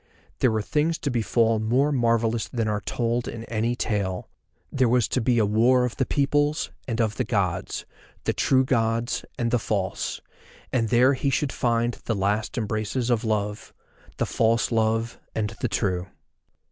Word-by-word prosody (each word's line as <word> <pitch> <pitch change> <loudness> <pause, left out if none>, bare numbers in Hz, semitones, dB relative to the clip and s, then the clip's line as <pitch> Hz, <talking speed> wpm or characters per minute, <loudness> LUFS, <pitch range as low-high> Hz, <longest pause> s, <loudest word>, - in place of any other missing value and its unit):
There 130 - +4
were 110 -1 0
things 150 - +1
to 145 - -2
befall 115 0 +2
more 125 +7 +2
marvellous 115 -3 +1
than 115 -3 -2
are 105 -1 -1
told 120 +1 -1
in 115 - -6
any 115 +1 -1
tale; 100 -6 -2 0.4
there 130 -3 +2
was 120 -2 +3
to 130 - 0
be 120 +1 +2
a 110 - +4
war 120 +5 +4
of 125 - -4
the 130 - 0
peoples, 145 +1 +1 0.2
and 115 -2 -2
of 110 -2 0
the 130 - +1
Gods, 100 -7 -1 0.4
the - - 0
True 130 0 +3
Gods 115 -1 0
and 115 -1 0
the 120 - +3
False, 100 -4 -2 0.5
and 115 -4 +1
there 125 +3 +5
he 140 +1 0
should 135 +1 0
find 120 0 0
the 110 - 0
last 105 +6 -1
embraces 110 +3 -1
of 120 0 +1
Love, 105 -1 -2 0.4
the - - +1
False 115 +2 +1
Love 115 0 0 0.2
and 105 -2 -1
the - - +1
True. 90 -1 -1
115 Hz, 170 wpm, -25 LUFS, 110-125 Hz, 0.5 s, there